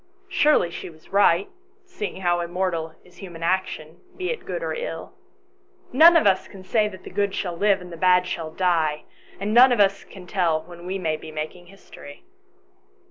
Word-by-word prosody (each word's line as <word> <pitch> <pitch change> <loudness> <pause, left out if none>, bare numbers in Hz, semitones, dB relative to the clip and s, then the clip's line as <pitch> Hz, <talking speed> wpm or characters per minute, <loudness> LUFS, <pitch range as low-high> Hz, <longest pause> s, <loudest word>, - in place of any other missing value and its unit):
Surely 300 - +3
she - - -7
was 155 -1 -19
right, 200 -2 +4 0.4
seeing 210 - -6
how 175 -1 +1
immortal 170 -2 -2
is 180 0 -21
human 175 -3 -9
action, 170 -3 -2 0.2
be 370 +2 -2
it 475 - -6
good - - -4
or - - -2
ill? - - -6 0.8
None 330 +5 +8
of 315 - +2
us 190 -2 +2
can 190 -2 -13
say 215 +2 +1
that 190 -3 -10
the - - -10
good 200 -1 -1
shall 175 -3 -3
live 200 +1 +2
and 180 -1 -10
the - - -8
bad 180 +1 +4
shall 165 -3 -4
die, 160 -3 0 0.4
and 205 +2 -2
none 250 +2 +8
of 240 - +1
us 195 -1 +3
can 190 -2 -13
tell 170 -4 0
when 175 +1 -12
we 190 +1 -2
may 160 -4 -1
be 155 - -10
making 155 +3 -6
history. 185 -6 -14
185 Hz, 190 wpm, -23 LUFS, 170-200 Hz, 0.8 s, None